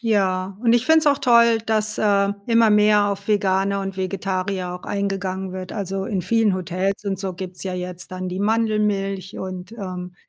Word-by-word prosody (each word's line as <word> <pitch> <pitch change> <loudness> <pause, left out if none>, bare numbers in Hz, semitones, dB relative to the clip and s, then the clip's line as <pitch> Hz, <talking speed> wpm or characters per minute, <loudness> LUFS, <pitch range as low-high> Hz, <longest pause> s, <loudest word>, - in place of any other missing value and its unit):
Ja, 195 -4 0
und 235 -1 +3
ich 240 0 +2
find's 320 0 +4
auch 285 - +5
toll, 235 -3 +5
dass, 215 -1 +1
äh, 200 -1 +3 0.2
immer 230 -1 +4
mehr 210 0 +4
auf 200 0 -4
Vegane 200 -1 +1
und 195 -1 -5
Vegetarier 190 -1 -2
auch 180 - -9
eingegangen 190 -2 -3
wird. 185 0 -6
Also, 195 -2 -3
in 195 -1 -2
vielen 215 +1 +2
Hotels 185 +2 -2
und 195 -2 -2
so 190 -1 -3
gibt's 180 0 -7
ja 190 - -3
jetzt 180 0 -6
dann 185 0 -4
die 185 +1 -4
Mandelmilch 210 -3 0
und, 185 +1 -6
ähm, 180 -5 -6
195 Hz, 180 wpm, -22 LUFS, 185-215 Hz, 0.2 s, auch